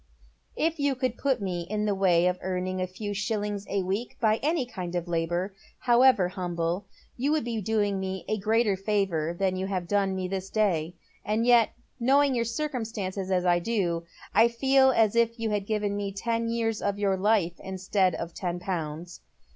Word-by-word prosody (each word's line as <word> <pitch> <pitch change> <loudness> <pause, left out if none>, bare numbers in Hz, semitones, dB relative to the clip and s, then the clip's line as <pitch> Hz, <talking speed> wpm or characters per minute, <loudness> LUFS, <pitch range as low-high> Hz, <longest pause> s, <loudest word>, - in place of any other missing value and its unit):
« 60 - -40
If 330 -1 -4
you 285 -1 +1
could 255 -2 -1
put 265 -6 0
me 180 -2 -2
in 210 0 -1
the 205 - +1
way 180 -3 +3
of 180 0 +1
earning 185 0 -2
a 185 - -1
few 205 +3 -5
shillings 205 0 -2
a 200 -1 0
week 200 +6 -3
by 220 -1 +3
any 305 0 0
kind 185 -7 -6
of 175 0 -2
labour, 175 +3 -1 0.3
however 240 -5 +5
humble, 175 +1 -2 0.3
you 275 +4 0
would 310 -4 +1
be 230 -2 -3
doing 205 -1 0
me 190 -1 -4
even - - -1
a 215 - -2
greater 220 -1 +2
favour 190 -5 0
than 190 -1 +1
you 190 +1 -2
have 185 -3 -3
done 195 -1 +1
me 185 -1 -2
this 190 0 -4
day; 180 -6 0 0.3
and 215 +2 0
yet, 240 -2 +5 0.3
knowing 275 +3 +4
your 235 -2 0
circumstances 225 -8 -3
as 185 -1 +1
I 175 -1 +4
do, 175 -4 -1 0.3
I 225 +4 +6
feel 265 +3 +4
as 225 -4 +3
if 230 0 +2
you 225 -1 -1
had 205 -1 -1
given 210 -2 -1
me 200 -1 -2
ten 230 +3 -1
years 225 -2 -1
of 200 0 -1
your 200 -2 +1
life 190 -3 +1
instead 190 -1 0
of 170 0 -5
ten 175 -2 -3
pounds. 175 -2 -5
200 Hz, 195 wpm, -27 LUFS, 185-230 Hz, 0.3 s, I